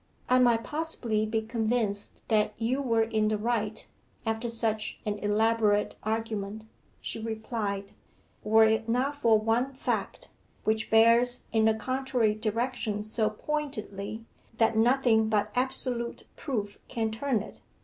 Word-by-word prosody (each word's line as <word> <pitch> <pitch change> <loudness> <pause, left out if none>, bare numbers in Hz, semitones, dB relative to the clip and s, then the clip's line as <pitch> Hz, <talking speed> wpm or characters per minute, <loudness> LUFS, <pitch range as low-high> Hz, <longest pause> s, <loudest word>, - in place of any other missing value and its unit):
'I 255 0 +5
might 235 -2 +4
possibly 245 -9 -1
be 220 0 -1
convinced 220 -2 -1
that 215 -1 +2
you 250 +5 0
were 230 -4 +2
in 220 -1 0
the 215 0 +1
right, 220 -1 -1 0.4
after 225 +1 -1
such 225 -2 0
an 205 -1 -2
elaborate 210 0 +2
argument,' 220 -1 -3 0.4
she - - -5
replied, 220 -3 -3 0.5
'were 220 +1 +5
it 220 +1 +1
not 265 +5 0
for 225 -3 +5
one 230 +5 0
fact, - - -3 0.3
which 220 0 0
bears 230 +2 +5
in 220 -1 +3
the 220 0 +4
contrary 255 -1 0
direction 220 0 -2
so 215 0 +1
pointedly, 220 -5 -4 0.3
that 225 0 +3
nothing 225 -1 +3
but 210 -1 +1
absolute 250 -2 -1
proof 210 -8 -4
can 225 -3 -2
turn 230 -1 -1
it. - - -13
225 Hz, 135 wpm, -28 LUFS, 215-240 Hz, 0.5 s, I